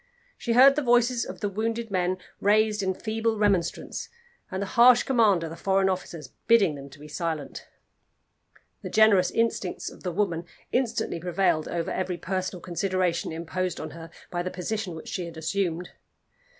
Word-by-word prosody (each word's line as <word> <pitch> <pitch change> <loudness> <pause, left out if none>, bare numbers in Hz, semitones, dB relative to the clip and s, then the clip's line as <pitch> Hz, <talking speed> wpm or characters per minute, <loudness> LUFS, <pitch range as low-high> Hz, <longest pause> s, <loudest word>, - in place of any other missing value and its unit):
She 235 - -2
heard 270 +3 +8
the 300 - +1
voices 245 -1 +3
of - - -8
the 205 - 0
wounded 225 +2 -3
men 185 0 0 0.2
raised 210 +1 +3
in 190 -1 -1
feeble 220 +1 -1
remonstrance, 200 -5 0 0.4
and 190 - -4
the 200 - -1
harsh 245 +1 +7
command 220 -9 +3
of 160 - -5
the - - -6
foreign 190 +2 +2
officers 170 -6 -5
bidding 215 -8 +5
them 140 -1 -9
be 150 - -11
silent. 155 -2 -4 1.1
The - - -6
generous 210 -4 +5
instincts 225 -5 -1
of - - -15
the 180 - -3
woman 175 -3 -1 0.3
instantly 240 -8 -1
prevailed 175 -2 +1
over 170 -1 -2
every 185 -1 -2
personal 185 0 -3
consideration 180 -1 -1
imposed 170 +2 -3
on - - -6
her 165 0 -10 0.2
by 175 - -1
the 180 - -3
position 185 0 -4
which 160 - -9
she 180 - -3
had 165 -1 -10
assumed. 175 +1 -2
185 Hz, 165 wpm, -26 LUFS, 170-220 Hz, 1.1 s, heard